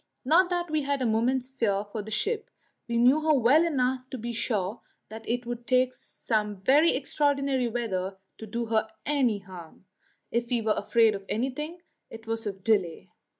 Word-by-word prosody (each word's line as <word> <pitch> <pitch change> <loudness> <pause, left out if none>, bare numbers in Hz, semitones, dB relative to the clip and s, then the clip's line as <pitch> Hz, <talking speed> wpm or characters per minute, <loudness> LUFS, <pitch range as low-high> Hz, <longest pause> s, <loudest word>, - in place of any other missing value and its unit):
Not 350 +6 +5
that 350 -2 -2
we 310 -1 +1
had 280 0 -1
a - - +1
moment's 240 +3 +1
fear 210 -6 -1
for 215 - -3
the 210 - -9
ship; 425 - -1 0.4
we 235 -1 -1
knew 255 +6 +5
her 310 -1 +3
well 270 +6 +5
enough 260 -5 0
to 260 - -5
be 235 +1 -5
sure 215 -3 -2 0.3
that 220 +1 -9
it 245 +1 -1
would 240 0 -6
take 255 0 +3
some 210 -5 -3
very 295 +7 +5
extraordinary 275 -2 0
weather 195 -5 -3 0.2
to 220 - -8
do 235 +3 -3
her 220 -1 0 0.2
any 265 -7 +2
harm. 185 -3 -12 0.5
If 235 0 -1
we 245 - +2
were 215 -1 +2
afraid 225 +1 +3
of 195 -1 -6
anything, 300 +9 -3 0.3
it 225 0 -11
was 225 -1 -3
of 195 -2 -6
delay. 195 -7 0
240 Hz, 185 wpm, -27 LUFS, 220-270 Hz, 0.5 s, Not